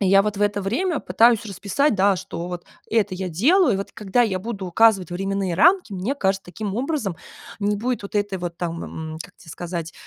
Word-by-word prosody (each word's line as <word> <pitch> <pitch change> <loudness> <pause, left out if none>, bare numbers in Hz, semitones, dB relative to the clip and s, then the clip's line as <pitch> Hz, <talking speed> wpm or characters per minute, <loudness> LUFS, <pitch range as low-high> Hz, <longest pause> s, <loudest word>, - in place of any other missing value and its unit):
И 195 - +2
я 195 +1 +6
вот 210 -1 -2
в 205 - -1
это 205 0 +1
время 290 - 0
пытаюсь 230 -1 +3
расписать, 210 +7 0
да, 195 0 +3
что 180 -1 -6
вот 175 -1 -6 0.3
это 210 -4 +1
я 185 0 -3
делаю. 255 - +4
И - - 0
вот 195 - -5
когда 210 +3 +1
я 190 -5 0
буду 205 -2 -5
указывать 195 -1 +3
временные 195 0 -1
рамки, 350 - +4
мне 195 +10 -2
кажется, 195 -5 0
таким 200 +2 -5
образом 255 - -1 0.5
не 205 +1 +1
будет 240 +3 -2
вот 200 +1 -5
этой 205 -2 -1
вот 175 -1 -5
там, 170 -1 -4 0.3
м, 160 - -7
как - - -16
те 165 - -18
сказать, 170 -1 -5
200 Hz, 215 wpm, -23 LUFS, 185-225 Hz, 0.5 s, я